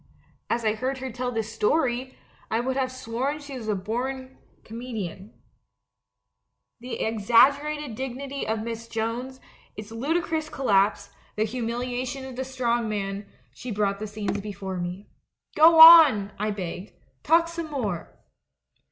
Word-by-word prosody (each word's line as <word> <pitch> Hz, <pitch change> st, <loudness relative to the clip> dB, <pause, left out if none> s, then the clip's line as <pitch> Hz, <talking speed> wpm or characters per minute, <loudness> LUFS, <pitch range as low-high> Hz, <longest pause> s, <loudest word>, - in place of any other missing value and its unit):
As 235 Hz, -1 st, -1 dB
I 215 Hz, -, +3 dB
heard 255 Hz, +4 st, -3 dB
her 260 Hz, 0 st, -5 dB
tell 250 Hz, +1 st, -3 dB
this 225 Hz, -2 st, -3 dB
story, 250 Hz, +3 st, 0 dB, 0.3 s
I 225 Hz, -, 0 dB
would 260 Hz, +2 st, -2 dB
have 260 Hz, -1 st, -1 dB
sworn 255 Hz, +3 st, -3 dB
she 285 Hz, -2 st, -9 dB
was 235 Hz, -4 st, -7 dB
a 210 Hz, -, +1 dB
born 260 Hz, +6 st, -4 dB, 0.3 s
comedienne. 220 Hz, -4 st, -7 dB, 1.5 s
The 250 Hz, +1 st, -6 dB
ex 220 Hz, -2 st, -3 dB
aggerated 285 Hz, +3 st, +4 dB
dignity 265 Hz, +3 st, -5 dB
of 220 Hz, 0 st, -1 dB
Miss 230 Hz, 0 st, -6 dB
Jones, 235 Hz, +4 st, -4 dB, 0.4 s
its 210 Hz, +1 st, -8 dB
ludicrous 315 Hz, +5 st, -1 dB
collapse, 205 Hz, -7 st, +1 dB, 0.2 s
the 215 Hz, -, +1 dB
humiliation 245 Hz, +3 st, -3 dB
of 260 Hz, -1 st, -8 dB
the 260 Hz, -, -3 dB
Strong 240 Hz, -3 st, -1 dB
Man, 200 Hz, -1 st, -4 dB, 0.3 s
she 245 Hz, -, -8 dB
brought 200 Hz, -2 st, -1 dB
the 215 Hz, -, -4 dB
scenes 205 Hz, -1 st, -3 dB
before 195 Hz, -2 st, -6 dB
me. 180 Hz, +3 st, -5 dB, 0.5 s
'Go 320 Hz, +1 st, +7 dB
on,' 315 Hz, -12 st, +9 dB
I 210 Hz, +1 st, 0 dB
begged, 190 Hz, -1 st, -6 dB, 0.3 s
*talk 335 Hz, +1 st, +3 dB
some 335 Hz, -1 st, -6 dB
more!' 215 Hz, -, -4 dB
235 Hz, 145 wpm, -25 LUFS, 215-265 Hz, 1.5 s, on